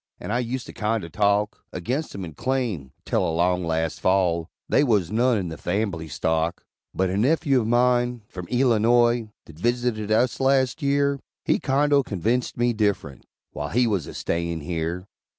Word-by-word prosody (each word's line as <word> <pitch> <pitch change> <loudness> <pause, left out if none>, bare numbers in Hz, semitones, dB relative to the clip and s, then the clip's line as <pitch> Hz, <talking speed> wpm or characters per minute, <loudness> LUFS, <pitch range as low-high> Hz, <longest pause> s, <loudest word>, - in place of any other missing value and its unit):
And 105 - -4
I 120 - +1
ust 125 +1 -3
to - - -10
kindo 105 -4 -1
talk 105 +1 +1
Aginst 125 - -3
'em, 95 -2 -5
and 80 -3 -10
claim, 115 - -2
'tel - - +1
along 90 +2 +1
last 80 -1 -1
Fall, 90 -3 +2 0.2
They 140 - +3
was 105 - +2
none 120 +2 +3
in 90 -4 -2
the 80 - -7
fambly 90 -4 -2
stock; 80 +4 -1 0.3
But 95 -1 0
a 95 - -1
nephew 140 +2 +3
of 110 - -3
mine, 120 0 +2
from 90 -2 -8
Eelinoy, 120 -1 +3 0.2
That 80 -1 -14
visited 120 -1 0
us 120 +3 +2
last 135 +2 +2
year, 140 0 +1 0.3
He - - +2
kindo 140 +1 +3
convinct 115 +2 -1
me 120 0 +2
differunt 100 - -1 0.3
While 75 0 -4
he 125 +3 +2
was 100 -9 0
a - - -9
stayin' 85 -1 -2
here. 85 +3 -3
110 Hz, 170 wpm, -24 LUFS, 90-125 Hz, 0.3 s, They